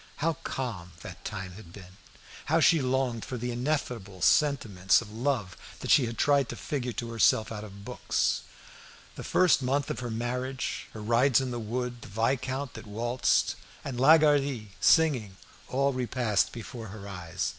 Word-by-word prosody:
How 165 +3 0
calm 95 -10 -4
that - - -10
time 95 -1 -5
had 90 -2 -12
been! 90 -1 -13 0.5
How 160 +2 +3
she 165 -1 +5
longed 130 -3 0
for 130 - -5
the 125 +1 -3
ineffable 120 - -3
sentiments 110 -11 +3
of 110 -3 -9
love 115 -5 -1 0.3
that - - -1
she 130 -5 +6
had 115 0 -6
tried 140 -3 +3
to - - -4
figure 130 -4 -3
to 115 +1 -5
herself 110 -1 +3
out 105 -1 -5
of 100 -1 -11
books! - - 0 0.7
The - - -8
first 180 -6 +3
month 135 +2 0
of - - -4
her 120 -1 -4
marriage, 125 +3 -3
her 110 - -7
rides 120 +4 +4
in 130 -1 -2
the 120 - -3
wood, 120 +2 -4
the - - -10
viscount 130 +5 -1
that - - -10
waltzed, 120 +4 +1 0.3
and 130 -4 -4
Lagardy 140 -6 +4
singing, 130 - +3 0.3
all 140 +1 +1
repassed 120 -4 0
before 115 -1 -8
her 100 0 -9
eyes. 90 -2 -3
120 Hz, 165 wpm, -28 LUFS, 105-135 Hz, 0.7 s, she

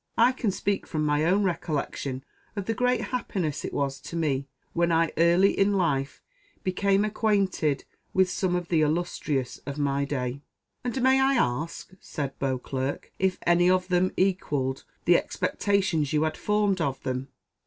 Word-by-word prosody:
I 235 +2 +6
can 255 -4 -1
speak 195 +1 -1
from 155 -2 -1
my 150 0 +2
own 195 +4 +3
recollection, 150 -6 -2 0.3
of 200 -2 -3
the 225 - 0
great 250 +2 +1
happiness 185 - -2
it - - -4
was 140 -1 -2
to - - -8
me, 140 -5 0 0.3
when 170 0 +2
I 165 0 +3
early 170 +4 +5
in 200 +1 +3
life 140 -8 0 0.4
became 195 +2 +2
acquainted 200 -9 +1 0.3
with 190 0 +3
some 180 0 0
of 175 -1 -3
the 165 -3 +3
illustrious 150 -4 -1
of 140 0 -4
my 140 -1 +1
day." 130 -1 -3 0.4
"And 250 +1 -2
may 265 +1 +5
I 270 +1 +3
ask," 150 - -1
said 140 -2 -5
Beauclerc, 130 0 -3
"if 190 -1 +1
any 175 +1 +4
of 185 0 +2
them 180 +1 +2
equalled 145 -8 0 0.2
the 175 0 +6
expectations 185 -8 0
you 150 0 +3
had 155 0 0
formed 205 -3 +1
of 135 -4 -2
them?" 130 +1 -3
170 Hz, 165 wpm, -27 LUFS, 140-195 Hz, 0.4 s, I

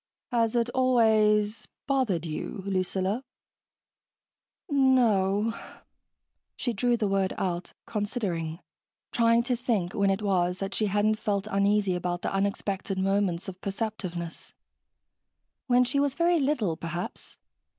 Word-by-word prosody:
"Has 230 -1 +1
it 235 0 +2
always... 220 -4 +3 0.2
bothered 245 - 0
you, 170 +5 -5
Lucilla?" 190 +4 -1 1.4
"No 265 -4 +4
o 200 -1 +2
o 225 - 0
o." - - -12 0.7
She 240 - -2
drew 240 +3 +1
the 215 -3 0
word 195 -1 +1
out, 175 -1 -3
considering, 195 -7 -3 0.5
trying 230 0 +3
to 250 +1 0
think 225 -7 -1
when 200 -1 +2
it 195 +2 0
was 180 -3 +1
that 195 0 -4
she 215 +2 +1
hadn't 210 +2 +1
felt 205 -2 -1
uneasy 200 0 +2
about 175 0 -2
the - - -2
unexpected 195 0 -1
moments 195 -2 0
of 185 -1 -8
perceptiveness. 195 -5 -5 1.1
When 250 0 +5
she 265 +3 0
was 280 -1 +1
very 340 0 +3
little, 265 - +1
perhaps. 170 +2 -6
205 Hz, 130 wpm, -27 LUFS, 190-235 Hz, 1.4 s, When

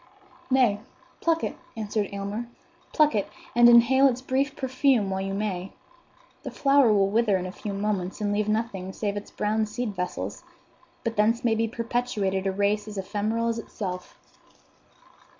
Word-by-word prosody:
"Nay, 250 -6 +3 0.4
pluck 330 -1 +1
it," - - -2 0.2
answered 210 -1 -2
Aylmer,—"pluck 240 - -2
it, 205 -2 -1 0.3
and 240 0 +8
inhale 245 +3 +6
its 255 -1 -1
brief 270 +2 0
perfume 260 -5 +1
while 190 0 -1
you 195 0 -3
may. 195 -3 -3 0.7
The - - -6
flower 275 -4 +4
will 195 -1 +3
wither 215 -3 +3
in 185 - -4
a 185 - -5
few 205 +2 -6
moments 195 -2 -2
and 205 -1 0
leave 210 0 0
nothing 205 -4 -2
save 205 -2 -2
its 205 - -6
brown 215 +1 0
seed 215 -1 -4
vessels; 180 0 -4 0.6
but 230 -2 -3
thence 230 +4 +2
may 230 - +4
be 225 +1 +1
perpetuated 220 -5 -1
a - - +1
race 205 +2 0
as 210 -1 -7
ephemeral 215 +4 -1
as 230 0 -2
itself." 185 -5 -6
215 Hz, 160 wpm, -26 LUFS, 200-240 Hz, 0.7 s, and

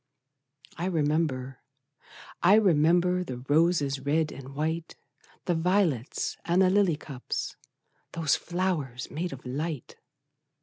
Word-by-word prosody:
I 170 - -2
remember, 150 -6 0 0.8
I 185 +4 +6
remember, 180 -2 +3
The 130 -8 -6
roses, 145 +1 +2
red 150 +3 0
and 135 0 -10
white, 160 +2 -2 0.5
The 175 - +1
violets, 165 - 0
and 175 +3 +3
the 185 - +4
lily 195 -5 +3
cups, 135 -4 -5 0.6
Those 160 -4 +2
flowers 170 -9 -2
made 175 +4 -3
of 135 -1 -9
light! 145 +2 -4
160 Hz, 115 wpm, -28 LUFS, 140-175 Hz, 0.8 s, I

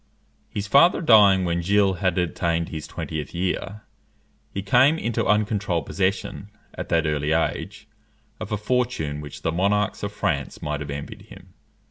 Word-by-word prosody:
His 100 - -4
father 140 - +5
dying 100 - +6
when 85 0 0
Gilles 95 0 +2
had 95 -1 0
attained 85 -1 -1
his 80 -2 -6
twentieth 80 +1 -6
year, 95 +3 -3 0.7
he 100 - -4
came 130 +10 +4
into 115 -7 -1
uncontrolled 105 - +1
possession, 100 +1 -2 0.2
at - - -7
that 80 -1 +2
early 75 0 0
age, 105 +6 -2 0.5
of 110 0 -7
a 105 - 0
fortune 105 -10 -1
which 75 -1 -10
the 80 - 0
monarchs 100 +5 0
of 100 - -3
France 80 -10 -2
might 75 -1 -3
have 75 -1 -6
envied 70 0 -7
him. - - -15
95 Hz, 155 wpm, -23 LUFS, 80-105 Hz, 0.7 s, dying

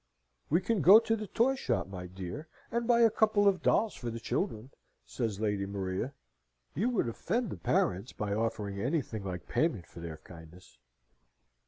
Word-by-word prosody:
"We 170 +5 +3
can 210 0 0
go 190 +8 +10
to 225 0 0
the 215 -1 -5
toy 240 +7 +2
shop, 270 - -1
my 90 -2 -7
dear, 95 - -7 0.2
and 235 0 -1
buy 235 -1 +5
a 230 -2 +6
couple 215 -2 +3
of 190 -2 +3
dolls 220 0 +2
for 120 - -5
the 115 0 -5
children," 115 +2 -3 0.3
says 110 -5 -3
Lady 105 -2 -1
Maria. 100 +6 -3 0.6
"You 210 - +1
would 230 - 0
offend 215 - -2
the - - -5
parents 95 +5 0
by 105 -1 -3
offering 105 -2 -2
anything 125 -5 -2
like 90 -2 -5
payment 150 - 0
for - - -13
their 85 -2 -6
kindness." 80 +1 -15
115 Hz, 175 wpm, -31 LUFS, -, 0.6 s, go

